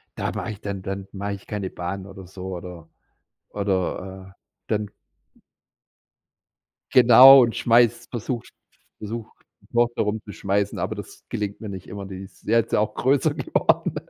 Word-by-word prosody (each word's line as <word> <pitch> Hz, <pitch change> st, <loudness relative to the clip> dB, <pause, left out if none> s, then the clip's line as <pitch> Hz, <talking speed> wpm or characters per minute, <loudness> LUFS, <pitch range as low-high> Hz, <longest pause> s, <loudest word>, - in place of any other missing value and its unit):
da -, -, -2 dB
mache -, -, -4 dB
ich 105 Hz, -, -10 dB
dann 100 Hz, -2 st, -5 dB
dann 95 Hz, 0 st, -5 dB
mache 100 Hz, +1 st, -4 dB
ich 100 Hz, -, -10 dB
keine 100 Hz, -3 st, -4 dB
Bahnen 95 Hz, +2 st, -5 dB
oder 95 Hz, -2 st, -11 dB
so 95 Hz, 0 st, -7 dB
oder 85 Hz, -2 st, -9 dB, 0.6 s
oder, 95 Hz, -1 st, -3 dB
äh, -, -, -65 dB, 0.3 s
dann 105 Hz, -1 st, -1 dB, 2.0 s
Genau 130 Hz, +2 st, +9 dB
und 115 Hz, -1 st, -1 dB
schmeiß 120 Hz, 0 st, +3 dB
versuch 120 Hz, 0 st, -4 dB, 0.6 s
versuch, 110 Hz, +1 st, -6 dB, 0.3 s
die -, -, -24 dB
Tochter 120 Hz, 0 st, +2 dB
herumzuschmeißen, 100 Hz, -1 st, -2 dB
aber -, -, -2 dB
das -, -, -10 dB
gelingt 105 Hz, -1 st, -4 dB
mir 105 Hz, -, -6 dB
nicht 95 Hz, -1 st, -8 dB
immer. 100 Hz, -1 st, -7 dB
Die 95 Hz, 0 st, -8 dB
ist 95 Hz, 0 st, -16 dB
jetzt 115 Hz, -1 st, +2 dB
ja -, -, +4 dB
auch 105 Hz, 0 st, 0 dB
größer 135 Hz, +1 st, +2 dB
geworden. -, -, 0 dB
100 Hz, 155 wpm, -23 LUFS, 95-115 Hz, 2.0 s, Genau